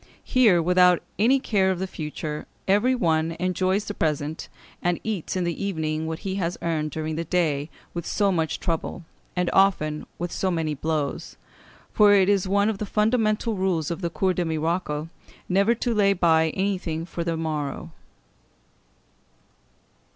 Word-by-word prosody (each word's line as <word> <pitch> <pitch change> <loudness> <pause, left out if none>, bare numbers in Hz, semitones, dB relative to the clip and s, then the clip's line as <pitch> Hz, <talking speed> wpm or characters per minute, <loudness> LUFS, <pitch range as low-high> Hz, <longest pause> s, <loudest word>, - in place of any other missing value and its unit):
Here, 215 -10 +4
without 180 0 +4 0.2
any 255 +6 +4
care 195 -6 +2
for - - -8
the 190 - -1
future, 150 -3 -5 0.2
every 210 +7 +3
one 165 -7 +1
enjoys 185 +3 0
the 205 - -4
present; 155 -2 -2 0.3
and 175 -1 0
eats 210 -7 -3
in 185 - 0
the 170 +2 -2
evening 160 -4 -2
what 160 0 -3
he 190 - -1
has 175 -2 -2
earned 155 -2 -1
during 155 +1 -4
the 165 - -1
day 160 -4 0 0.2
with 170 -1 -5
so 200 -2 +2
much 160 -3 -1
trouble, 170 +1 -3 0.3
and 180 -1 0
often 155 -6 +2
with 175 0 -4
so 190 - -1
many 165 -3 -1
blows; 150 0 -3 0.6
for 210 -1 +6
it 195 -1 +4
is 200 -2 +2
one 200 +2 +2
of 215 -3 -1
the 210 - -3
fundamental 220 +1 +1
rules 180 -5 0
of 170 - -4
the 170 - -1
Cour 185 +3 0
des 180 - -1
Miracles 160 -1 -1 0.4
never 200 +5 +3
to 240 +1 -1
lay 200 -2 +4
by 160 -3 +3
anything 185 -4 -2
for 170 0 -4
the 165 -1 -2
morrow. 155 0 -3
175 Hz, 165 wpm, -25 LUFS, 160-195 Hz, 0.6 s, for